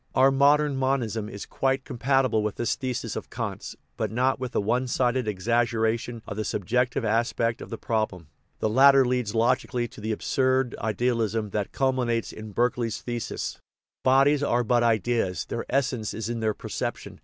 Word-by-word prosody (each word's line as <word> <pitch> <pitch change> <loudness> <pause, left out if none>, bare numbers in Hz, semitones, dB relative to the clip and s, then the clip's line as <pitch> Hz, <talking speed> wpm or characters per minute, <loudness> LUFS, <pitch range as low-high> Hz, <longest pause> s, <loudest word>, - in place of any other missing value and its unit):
Our 135 +1 +6
modern 145 +1 +3
monism 120 -5 -1
is 100 -2 -7
quite 135 0 0
compatible 130 -2 +1
with 105 -1 -2
this 120 - 0
thesis 130 -3 -3
of - - -6
Kant's, - - -5 0.2
but 110 - -1
not 130 +3 +1
with 130 -2 -4
the - - +1
one 120 +5 0
sided 125 -1 +1
exaggeration 115 +2 0
of 105 - -6
the 110 - -1
subjective 120 +5 0
aspect 115 +1 0
of - - -8
the 115 - -5
problem; 110 -9 -2 0.3
the - - 0
latter 135 +4 +6
leads 125 -3 -1
logically 120 +1 +1
to - - -12
the 110 +1 -2
absurd 130 +3 +1
ideal 115 +3 0
ism 110 -1 -1
that 105 -1 -2
culminates 125 -4 0
in 110 0 -8
Berkeley's 120 +1 0
thesis, 120 -2 -4 0.2
" - - -68
Bodies 135 +2 +4
are 125 -4 +1
but 120 +1 +2
ideas; 115 -4 +1
their 115 - -5
essence 125 -5 -1
is 110 0 -4
in 120 -1 -2
their 110 -1 0
perception." - - -5
120 Hz, 175 wpm, -26 LUFS, 110-130 Hz, 0.3 s, Our